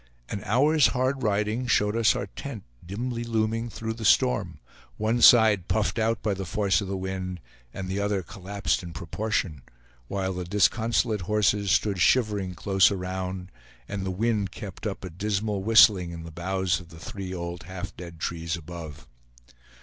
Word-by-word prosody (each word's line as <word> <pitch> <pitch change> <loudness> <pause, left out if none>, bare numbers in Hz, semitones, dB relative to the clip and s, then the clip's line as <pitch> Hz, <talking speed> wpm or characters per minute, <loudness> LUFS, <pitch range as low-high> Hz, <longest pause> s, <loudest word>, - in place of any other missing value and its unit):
An 100 - -4
hour's 145 +8 +4
hard 130 +1 0
riding 105 +3 0
showed 105 -2 +2
us 115 -4 +4
our - - -2
tent 110 +2 -8 0.2
dimly 115 +6 -4
looming 115 0 -1
through 110 0 -4
the 115 0 -8
storm, 65 -10 +2 0.4
one 110 +3 0
side 110 -7 +7
puffed 110 +1 0
out 110 0 0
by 105 - +1
the 95 0 -4
force 100 +3 +1
of 100 - -4
the 95 0 -3
wind, 95 -1 -4 0.3
and 95 +5 -6
the 95 +2 -2
other 100 -2 0
collapsed 100 +2 -2
in 85 -2 -8
proportion, 85 - -2 0.5
while 95 +2 -2
the 90 0 -4
disconsolate 110 +3 +1
horses 105 +1 +1
stood 100 0 +2
shivering 100 -3 +2
close 95 +1 +4
around, 95 -1 -4 0.4
and 100 -1 -4
the 95 - -2
wind 105 +1 0
kept - - -7
up - - -5
a - - -5
dismal 105 +2 -2
whistling 100 -4 +6
in 85 -1 -7
the 85 - -9
boughs 95 +2 -1
of 90 - -13
three 90 +4 -7
old 85 -1 -5
half 95 +1 -7
dead 85 -2 -10
trees 85 +1 -2
above. 80 -4 -9
100 Hz, 165 wpm, -26 LUFS, 90-110 Hz, 0.5 s, side